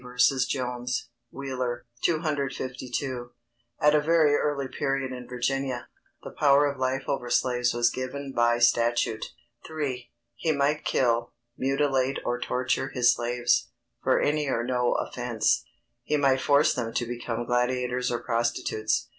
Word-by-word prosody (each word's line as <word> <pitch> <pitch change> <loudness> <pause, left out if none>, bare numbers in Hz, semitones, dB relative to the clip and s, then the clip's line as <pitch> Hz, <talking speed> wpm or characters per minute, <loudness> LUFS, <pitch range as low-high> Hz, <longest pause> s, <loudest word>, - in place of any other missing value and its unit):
v. 125 0 -12 0.3
Jones. 125 -1 -2 0.2
Wheeler, 130 -3 -4 0.2
252.] 130 -5 -2 0.5
At 150 0 +5
a 150 - +4
very 155 -1 +4
early 145 -2 0
period 135 0 -2
in 125 -1 -7
Virginia, 125 0 -2 0.3
the - - -7
power 145 0 +4
of 140 -2 -2
life 130 +1 0
over 125 -3 -2
slaves 125 0 +2
was 120 0 +3
given 135 +2 -5
by 120 -2 +3
statute. 120 -2 +2 0.4
III. 140 -6 -4 0.3
_He 155 -3 +2
might 145 +2 +1
kill, 120 -2 +1 0.2
mutilate 135 0 +1
or 120 0 -1
torture 130 +2 -1
his 120 -2 +4
slaves, 120 0 +1 0.3
for - - +3
any 150 0 +1
or 120 -3 0
no 125 0 +1
offence; - - 0 0.4
he 150 - 0
might 135 -2 +3
force 145 +1 +4
them 115 -2 -4
to 120 - 0
become 120 0 -4
gladiators 125 +1 0
or 120 - -2
prostitutes_. 115 -2 0
130 Hz, 140 wpm, -27 LUFS, 120-140 Hz, 0.5 s, At